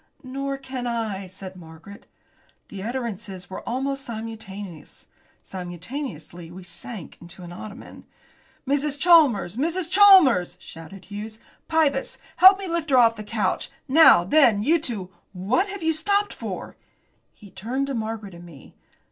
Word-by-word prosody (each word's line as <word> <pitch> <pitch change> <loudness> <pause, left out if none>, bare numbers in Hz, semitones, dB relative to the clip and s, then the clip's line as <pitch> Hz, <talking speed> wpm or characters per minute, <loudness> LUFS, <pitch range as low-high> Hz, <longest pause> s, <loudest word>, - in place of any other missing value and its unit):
"Nor 275 +1 -4
can 260 -2 -6
I," 220 -5 -3
said 185 +1 -9
Margaret. 165 +3 -13 0.6
The 195 - -8
utterances 210 -5 -5
were - - -6
almost 270 +2 -2
simultaneous. 210 - -9 0.3
Simultaneously 175 - -7
we 180 +2 -11
sank 195 0 -8
into 175 +1 -11
an 175 - -9
ottoman. 205 +4 -11 0.6
"Mrs. 285 +1 0
Chalmers! 275 - +4
Mrs. 335 +4 -1
Chalmers!" 365 - +6
shouted 165 +3 -11
Hughes, 210 +2 -8 0.3
"Pybus, 300 -4 +1 0.2
help 380 +1 +9
me 390 - -6
to 340 - -4
lift 330 -2 -2
her 265 - +4
off 230 -2 +5
the 215 - -7
couch. 210 -2 -2 0.2
Now, 280 - +7
then, 225 - +4
you 325 +7 +3
two, 210 - -4 0.2
what 205 - 0
have 400 -3 -7
you 320 0 +2
stopped 405 +6 0
for?" - - -7 0.6
He 205 -3 -16
turned 250 +9 -3
to 275 - -4
Margaret 220 -4 -5
and 170 0 -12
me. 160 -6 -14
225 Hz, 145 wpm, -24 LUFS, 190-280 Hz, 0.6 s, help